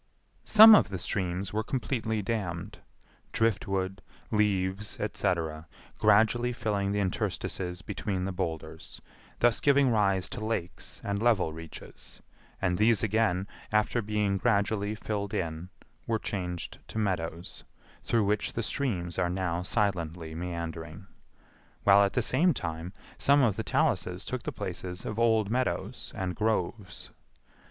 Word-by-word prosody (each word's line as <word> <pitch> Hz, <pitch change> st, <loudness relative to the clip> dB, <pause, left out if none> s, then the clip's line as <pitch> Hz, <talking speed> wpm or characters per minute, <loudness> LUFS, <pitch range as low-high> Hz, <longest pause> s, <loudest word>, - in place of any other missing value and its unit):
Some 220 Hz, +1 st, +10 dB
of 210 Hz, -, +6 dB
the 95 Hz, -, -3 dB
streams 90 Hz, +2 st, -2 dB
were 110 Hz, -, +1 dB
completely 110 Hz, -5 st, -2 dB
dammed; 95 Hz, -6 st, -3 dB, 0.5 s
driftwood, 95 Hz, -3 st, 0 dB, 0.3 s
leaves, 100 Hz, -1 st, 0 dB
etc., 80 Hz, -2 st, -2 dB, 0.3 s
gradually 110 Hz, +3 st, +4 dB
filling 105 Hz, -5 st, -1 dB
the 105 Hz, -, 0 dB
interstices 90 Hz, -1 st, -2 dB
between 95 Hz, -3 st, -3 dB
the 95 Hz, -, -2 dB
boulders, 85 Hz, -4 st, -5 dB, 0.4 s
thus 120 Hz, -1 st, +3 dB
giving 140 Hz, -2 st, +4 dB
rise 100 Hz, -4 st, +2 dB
to 110 Hz, -, -6 dB
lakes 110 Hz, -6 st, -4 dB
and 100 Hz, 0 st, -2 dB
level 110 Hz, -9 st, +2 dB
reaches; 80 Hz, -1 st, -11 dB, 0.4 s
and 90 Hz, -2 st, 0 dB
these 110 Hz, 0 st, +4 dB
again, 105 Hz, -3 st, +1 dB, 0.2 s
after 105 Hz, +2 st, +2 dB
being 105 Hz, -2 st, 0 dB
gradually 105 Hz, -1 st, +1 dB
filled 105 Hz, -2 st, -3 dB
in, 80 Hz, +2 st, -3 dB, 0.4 s
were 115 Hz, -, +1 dB
changed 90 Hz, -5 st, -4 dB
to -, -, -8 dB
meadows, 90 Hz, -5 st, -3 dB, 0.4 s
through 115 Hz, -3 st, +1 dB
which 105 Hz, +1 st, 0 dB
the 115 Hz, -, -2 dB
streams 95 Hz, -, -2 dB
are 90 Hz, -, +1 dB
now 90 Hz, -2 st, -1 dB
silently 90 Hz, -5 st, -1 dB
meandering; 85 Hz, +1 st, -5 dB, 0.8 s
while 100 Hz, 0 st, +7 dB
at 100 Hz, -, 0 dB
the 125 Hz, -, +1 dB
same 155 Hz, +8 st, +3 dB
time 80 Hz, -1 st, -4 dB, 0.3 s
some 140 Hz, 0 st, +5 dB
of 110 Hz, -6 st, +3 dB
the -, -, -2 dB
taluses -, -, 0 dB
took -, -, -3 dB
the -, -, -4 dB
places 90 Hz, 0 st, -5 dB
of 110 Hz, -, -3 dB
old 110 Hz, -3 st, +3 dB
meadows 130 Hz, +1 st, -2 dB
and 95 Hz, -1 st, -3 dB
groves. 110 Hz, -2 st, -2 dB
100 Hz, 135 wpm, -29 LUFS, 90-110 Hz, 0.8 s, Some